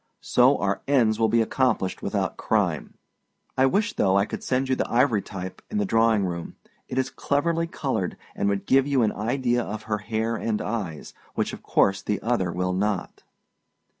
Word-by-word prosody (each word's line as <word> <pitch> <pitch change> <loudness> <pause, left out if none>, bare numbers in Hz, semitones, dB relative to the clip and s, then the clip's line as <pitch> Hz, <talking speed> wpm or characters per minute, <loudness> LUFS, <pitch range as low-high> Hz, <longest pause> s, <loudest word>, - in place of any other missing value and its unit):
So - - +4
our 100 +2 -1
ends 120 -6 +3
will 110 -1 +3
be 115 -1 +3
accomplished 120 -5 0
without - - -1
crime. - - -1 0.6
I 130 0 +4
wish, 205 +10 +1
though, 95 0 +2
I 100 - +3
could - - -6
send 130 +1 0
you 130 - +2
the - - -1
ivorytype 105 -7 0
in 215 - -3
the 205 - +1
drawing 115 - +3
room; 85 -2 -5 0.3
it 130 - -4
is 130 0 0
cleverly 165 +5 0
colored, 130 - -2 0.2
and 100 - 0
would 100 -1 -1
give 135 +1 +4
you 135 -4 +2
an 105 - +2
idea 120 +3 0
of 110 -1 -5
her 105 -1 -2
hair 110 +1 -2
and 110 -2 -1
eyes, 100 -9 -4 0.2
which - - -1
of - - -8
course 100 0 +2
the 105 0 -1
other 110 -7 0
will 90 +1 -1
not. 100 0 -2
110 Hz, 185 wpm, -25 LUFS, 100-130 Hz, 0.6 s, So